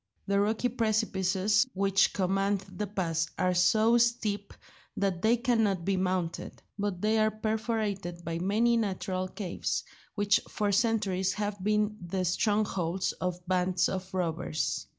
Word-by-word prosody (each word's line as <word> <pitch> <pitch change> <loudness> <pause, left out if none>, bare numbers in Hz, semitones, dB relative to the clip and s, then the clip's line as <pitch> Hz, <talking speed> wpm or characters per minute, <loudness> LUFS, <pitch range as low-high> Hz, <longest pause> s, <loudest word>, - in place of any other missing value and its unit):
The 200 0 +1
rocky 220 +4 +1
precipices 215 -2 +1
which 195 0 +3
command 195 +1 0
the 210 - -2
pass 170 -5 -1
are 180 0 +2
so 220 +6 +4
steep 220 -4 0 0.5
that 190 -3 0
they 225 +3 +4
cannot 225 -7 +1
be 195 - +1
mounted; 185 -2 -2 0.2
but 200 -3 -2
they 220 +1 +3
are 215 0 +4
perforated 215 -5 -2
by 165 0 -3
many 220 +6 +2
natural 190 -3 -2
caves, 185 -2 -3 0.3
which 205 -1 +3
for 205 -1 -1
centuries 200 -4 +1
have 205 -2 -3
been 210 +1 +1
the 185 +1 -2
strongholds 190 -2 0
of 180 -1 -4
bands 180 0 +2
of 185 0 -4
robbers. 165 - -2
200 Hz, 135 wpm, -29 LUFS, 185-215 Hz, 0.5 s, so